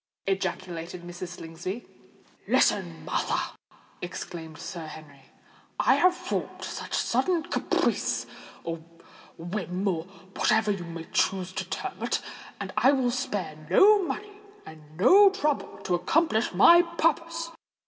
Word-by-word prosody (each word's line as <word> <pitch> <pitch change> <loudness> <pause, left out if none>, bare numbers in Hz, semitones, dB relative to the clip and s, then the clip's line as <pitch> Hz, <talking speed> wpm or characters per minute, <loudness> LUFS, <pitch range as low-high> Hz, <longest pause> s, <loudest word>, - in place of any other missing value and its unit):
ejaculated 180 -2 -3
Mrs. 175 +1 -7
Slingsby. 170 +7 -6 0.6
"Listen, 80 -2 +2
Martha," - - -1 0.5
exclaimed 165 -3 -7
Sir 165 0 -6
Henry. 145 -3 -12 0.5
"I - - +5
have 365 0 +4
formed - - -4
this - - -4
sudden 355 -3 +1
caprice—or 170 - -2 0.6
whim—or 180 0 -2
whatever 195 +3 0
you 190 -4 -3
may 165 -1 -7
choose 185 -1 +1
to - - -3
term - - -5
it; - - 0 0.4
and 195 -2 -5
I 235 +6 +5
will 255 -3 +2
spare 205 - -3
no 415 +1 +7
money 405 +6 -5 0.3
and 160 0 -11 0.2
no 385 - +8
trouble 305 -7 -1
to 180 - -1
accomplish 220 - +2
my 340 - +8
purpose. 335 0 -1
190 Hz, 115 wpm, -27 LUFS, -, 0.6 s, no